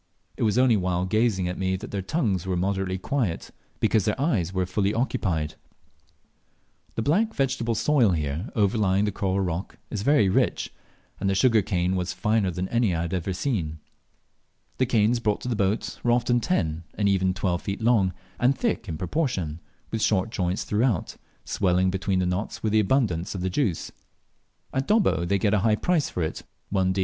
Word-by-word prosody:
It - - -9
was 105 -1 +2
only 125 -2 +5
while 90 -2 0
gazing 105 -2 +1
at 90 - -4
me 95 0 0
that 100 +6 -7
their 100 - -2
tongues 95 - -1
were 90 -1 0
moderately 95 0 -1
quiet, 105 -3 -2 0.3
because 110 -4 +2
their 105 - 0
eyes 110 - +1
were 95 -1 0
fully 100 +3 0
occupied. 95 - -1 1.4
The 115 - -1
black 210 - +1
vegetable 130 -4 0
soil 130 -2 +3
here 75 - -2
overlying 100 -2 +2
the 105 - 0
coral 100 0 -1
rock 90 0 -3
is 105 - -2
very 115 -3 +4
rich, 95 - 0 0.5
and 95 - 0
the 95 - +1
sugar 115 +2 +4
cane 90 -1 0
was 90 -1 -2
finer 105 -3 +1
than 90 +1 -3
any 115 -6 +2
I 80 - -1
had 85 - -4
ever 90 +1 -1
seen. 90 - -2 1.0
The 130 - +3
canes 115 0 +3
brought 105 -3 0
to - - -6
the 120 - 0
boat 100 +1 -1
were 120 - +2
often 120 0 +2
ten 85 - -1
and 100 - +1
even 95 -1 +2
twelve 90 -3 -1
feet 100 0 -4
long, 110 -5 +3 0.3
and 130 +3 +3
thick 235 - -1
in 80 - -3
proportion, 90 - -2 0.3
with 115 - -2
short 105 0 +1
joints 90 -3 -1
throughout, 105 -3 0 0.3
swelling 95 -1 +1
between 95 0 -1
the 90 - +1
knots 90 +4 -3
with 110 - +1
the 110 - +5
abundance 100 -6 +1
of 90 - -4
the 95 - 0
rich - - -9
juice. 105 - -1 0.8
At 135 +1 -1
Dobbo 205 - +3
they 100 +3 +2
get 100 +2 +1
a 105 - +4
high 105 +2 +3
price 165 +4 +1
for 90 - -2
it, 80 - -3 0.3
1d. 95 -1 +1
100 Hz, 190 wpm, -25 LUFS, 90-115 Hz, 1.4 s, only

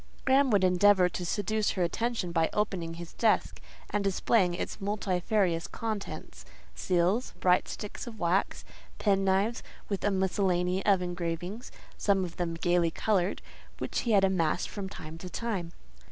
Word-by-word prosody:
Graham 270 +1 +4
would 205 -4 +3
endeavour 185 0 +5
to 180 - -5
seduce 210 +4 0
her 180 - +2
attention 225 0 -1
by 165 -1 +2
opening 185 -6 -1
his 170 0 -9
desk 225 -2 +1 0.3
and 205 -1 0
displaying 190 -1 +2
its 190 - -5
multifarious 190 -3 0
contents: 215 -3 -5 0.3
seals, 185 +6 0
bright 180 0 +3
sticks 210 +3 -6
of 225 -2 -8
wax, 175 +2 0 0.3
pen 195 -2 +2
knives, 195 +4 +1 0.3
with 200 -2 -2
a 205 - +3
miscellany 190 -1 +1
of 195 -3 +4
engravings—some 180 +3 -3
of 175 - -9
them 170 -2 -2
gaily 175 0 +2
coloured—which 190 +1 -2
he 235 - 0
had 195 -1 +5
amassed 180 -3 +1
from 195 -2 -5
time 160 -3 -9
to 180 - -7
time. 195 -6 -3
190 Hz, 145 wpm, -29 LUFS, 175-205 Hz, 0.3 s, endeavour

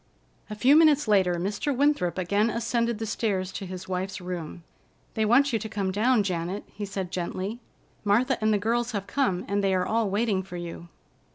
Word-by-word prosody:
A 210 - -5
few 255 +7 +5
minutes 305 -4 +5
later 190 -4 +3
Mr. 200 +10 -2
Winthrop 280 -12 +2
again 200 +5 +1
ascended 235 0 0
the 225 - -4
stairs 195 -4 -1
to 195 - -6
his 185 +1 -7
wife's 185 +1 -3
room. 175 -2 -6 0.5
"They 220 - +1
want 260 +5 +4
you 225 - +2
to 220 +1 -6
come 200 -3 -2
down, 220 +3 +3
Janet," 180 +1 -3
he 205 - -5
said 195 -2 -5
gently. 185 +5 -3 0.4
"Martha 235 +6 +2
and 215 0 +3
the 210 - +3
girls 230 +3 -1
have 200 -2 -2
come, 200 -10 0
and 200 0 0
they 190 -1 +2
are 180 0 +1
all 220 0 +1
waiting 205 -1 +1
for 180 -1 -8
you." 170 0 -7
205 Hz, 195 wpm, -26 LUFS, 185-230 Hz, 0.5 s, few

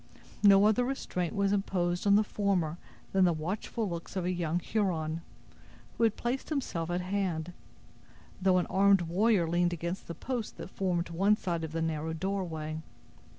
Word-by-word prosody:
No 200 -1 +7
other 220 +3 +4
restraint 200 -9 -2
was 200 -1 +2
imposed 180 -2 0
on 200 - +6
the 210 - +5
former 185 -6 0 0.3
than 190 -1 +3
the 180 - +5
watchful 195 +7 -3
looks 170 0 -6
of 185 -2 -1
a 180 - +1
young 175 -2 -1
Huron, 170 -5 -1 0.7
who - - 0
had 225 -2 +3
placed 245 +3 -2
himself 215 - -2
at 175 +1 0
hand; 180 -3 -2 0.9
though 185 -1 +4
an 180 - +2
armed 195 0 +4
warrior 185 +1 +2
leaned 175 +1 +2
against 170 +2 -4
the 170 - -5
post 245 +3 -4
that - - -8
formed 175 -3 -1
one 195 +5 +3
side 170 -5 -2
of 160 - -4
the 165 0 -1
narrow 160 0 -2
doorway. 160 -4 -3
180 Hz, 170 wpm, -30 LUFS, 170-200 Hz, 0.9 s, No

